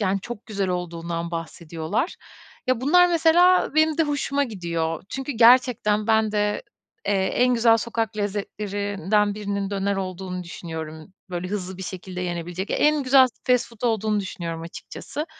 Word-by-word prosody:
yani, 195 -1 +1
çok 235 +1 -8
güzel 200 -3 -2
olduğundan 170 -1 -3
bahsediyorlar. 165 - -3 0.5
Ya, 255 -2 +1
bunlar 355 +7 +5
mesela 350 +2 +4
benim 315 0 +3
de - - +5
hoşuma 285 -1 0
gidiyor. 170 - -3
Çünkü 270 +5 -4
gerçekten 230 -3 +4
ben 220 -1 +3
de, 210 0 0 0.4
eee, 205 - +2
en 240 +6 +2
güzel 230 -1 +5
sokak 225 -2 -2
lezzetlerinden 205 0 -1
birinin 200 -1 -3
döner 200 0 -1
olduğunu 185 -1 -4
düşünüyorum. 160 0 -7 0.2
Böyle, 180 0 -3
hızlı 190 -2 -4
bir - - -5
şekilde 185 0 -6
yenebilecek 175 +1 -4
en 300 -1 +3
güzel 260 0 +6 0.2
fast 250 -2 +2
food 230 -1 -17
olduğunu 215 -1 0
düşünüyorum 170 -4 -5
açıkçası. 290 - -7
205 Hz, 145 wpm, -24 LUFS, 180-240 Hz, 0.5 s, güzel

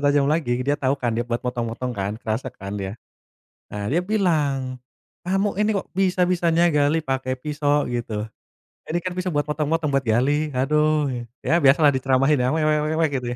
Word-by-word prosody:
tajam 145 -1 +3
lagi, 155 -6 -1
dia 145 +2 +1
tau 135 +1 +1
kan, 120 -4 -1
dia 120 +1 -1
buat 120 0 -1
motong-motong, 125 0 -3
kan. 100 -1 -3
Kerasa 115 +3 -3
kan, 100 -5 -8
dia. 95 +3 -5 0.8
Nah, 105 0 -3
dia 155 - +1
bilang, 145 -11 0 0.5
"Kamu 195 +2 0
ini, 210 +1 +2
kok 195 - -3
bisa-bisanya 175 -2 +2
gali 150 +1 +2
pake 130 -2 -2
pisau?" 145 -1 0
Gitu. 115 -3 -3 0.7
"Ini 170 - 0
kan 185 - -2
pisau 185 +1 -3
buat 145 -3 0
motong-motong, 150 0 -1
buat 135 - +3
gali, 145 +7 +2
aduh!" 150 +1 +2 0.3
Ya, 170 +1 +3
biasalah, 145 +1 +5
diceramahin 135 +1 +2
ya, 125 - +2
"We 155 - +1
we 155 0 +3
we 155 - -1
we," 165 -1 +3
gitu 125 -2 -2
145 Hz, 180 wpm, -23 LUFS, 125-160 Hz, 0.8 s, biasalah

